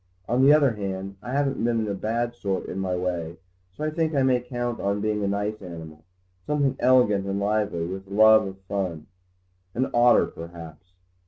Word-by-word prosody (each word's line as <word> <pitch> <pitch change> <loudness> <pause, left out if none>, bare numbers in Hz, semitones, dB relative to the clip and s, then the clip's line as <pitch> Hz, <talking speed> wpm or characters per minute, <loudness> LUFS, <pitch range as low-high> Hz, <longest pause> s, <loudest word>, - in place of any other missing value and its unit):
On 120 +2 +1
the 140 - +7
other 145 -3 +5
hand, 100 -2 -5
I 120 - -7
haven't 135 -2 0
been 115 -2 +1
a 100 - -2
bad 115 +4 -2
sort 100 -5 -3
in 95 - -5
my 95 -1 -1
way, 85 -2 -3 0.3
so 90 - -8
I 155 - -1
think 160 -1 -1
I 135 - +3
may 130 -1 +3
count 120 -1 -4
on 100 +1 -1
being 105 0 -1
a - - 0
nice 105 +2 -2
animal, 80 -4 -10 0.4
something 140 -3 +1
elegant 120 -6 +3
and 100 0 -1
lively, 100 -4 0
with 95 +2 -6
a - - -16
love 110 0 +6
of 95 0 -8
fun. 95 -5 -4 0.7
An 130 +2 -1
otter, 120 0 +5
perhaps." 85 +1 -11
105 Hz, 190 wpm, -25 LUFS, 95-120 Hz, 0.7 s, the